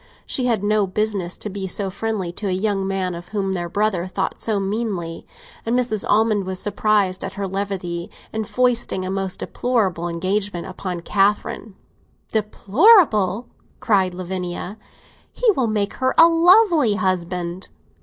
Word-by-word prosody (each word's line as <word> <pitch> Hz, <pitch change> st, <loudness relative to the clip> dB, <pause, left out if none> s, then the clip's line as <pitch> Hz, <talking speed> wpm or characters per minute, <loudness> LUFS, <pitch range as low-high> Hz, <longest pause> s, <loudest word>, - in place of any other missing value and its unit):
She 255 Hz, -, -1 dB
had 225 Hz, -5 st, +1 dB
no 210 Hz, -1 st, +2 dB
business 195 Hz, -2 st, -1 dB
to -, -, -5 dB
be 195 Hz, -1 st, -4 dB
so 190 Hz, +1 st, -2 dB
friendly 205 Hz, -3 st, -3 dB
to 200 Hz, +4 st, -5 dB
a -, -, 0 dB
young 195 Hz, 0 st, 0 dB
man 190 Hz, -2 st, -1 dB
of 175 Hz, +1 st, -8 dB
whom 195 Hz, -1 st, -2 dB
their 175 Hz, -2 st, -3 dB
brother 200 Hz, -2 st, 0 dB
thought 190 Hz, +1 st, -3 dB
so 215 Hz, -3 st, 0 dB
meanly, 195 Hz, -5 st, -3 dB, 0.4 s
and 235 Hz, +2 st, 0 dB
Mrs. 235 Hz, -5 st, -1 dB
Almond 215 Hz, -1 st, +3 dB
was 190 Hz, 0 st, -3 dB
surprised 205 Hz, -2 st, +1 dB
at -, -, -5 dB
her 200 Hz, -, -3 dB
levity 185 Hz, -3 st, -4 dB, 0.2 s
in 220 Hz, 0 st, -1 dB
foisting 240 Hz, -6 st, +1 dB
a 185 Hz, -, -3 dB
most 195 Hz, -1 st, -2 dB
deplorable 195 Hz, -9 st, -1 dB
engagement 185 Hz, +1 st, -1 dB
upon 185 Hz, -2 st, -5 dB
Catherine. 205 Hz, +2 st, 0 dB, 0.6 s
"Deplorable?" 215 Hz, -, +4 dB, 0.3 s
cried 190 Hz, -5 st, +2 dB
Lavinia. 185 Hz, +2 st, -5 dB, 0.5 s
"He -, -, +3 dB
will 260 Hz, -, 0 dB
make 210 Hz, -2 st, -1 dB
her 260 Hz, 0 st, 0 dB
a 330 Hz, -, +9 dB
lovely 335 Hz, -, +5 dB
husband!" 180 Hz, -2 st, -2 dB
200 Hz, 150 wpm, -21 LUFS, 185-220 Hz, 0.6 s, a